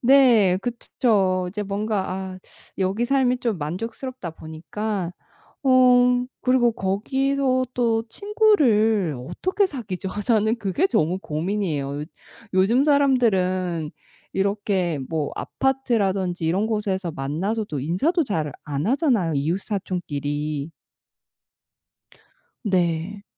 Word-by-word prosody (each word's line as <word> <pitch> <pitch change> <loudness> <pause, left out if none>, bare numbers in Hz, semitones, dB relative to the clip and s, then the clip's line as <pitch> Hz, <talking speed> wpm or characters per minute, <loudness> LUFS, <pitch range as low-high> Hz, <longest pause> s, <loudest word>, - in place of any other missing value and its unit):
네. 240 -8 +5
그츠 240 -1 -5
쵸. 190 -7 +3
이제 210 +2 -4
뭔가 205 0 -2
아 190 0 -5 0.4
여기 195 +5 0
삶이 255 -1 +2
좀 230 -7 -1
만족스럽다 220 - -5
보니깐 170 +5 -4 0.5
어 250 -1 +5 0.2
그리고 250 -2 +3
거기서 255 +6 0
또 230 -2 +1
친구를 225 - +3
어떻게 370 - +1
사귀죠? 210 - -5 0.2
저는 220 0 +2
그게 215 - 0
너무 185 - +1
고민이에요. 155 -5 -2 0.5
요즘 215 +8 +4
사람들은 190 - +2 0.4
이렇게 195 -5 0
뭐 155 -3 -2
아파트라든지 200 -10 0
이런 185 +6 +1
곳에서 195 -5 -1
만나서도 160 +6 -2
인사도 190 - +1
잘 160 - -2
안 145 +2 -2
하잖아요, 245 - +2
이웃사촌끼리. 150 -3 -2 1.9
네. 185 -1 -1
200 Hz, 235 characters per minute, -23 LUFS, 175-245 Hz, 1.9 s, 네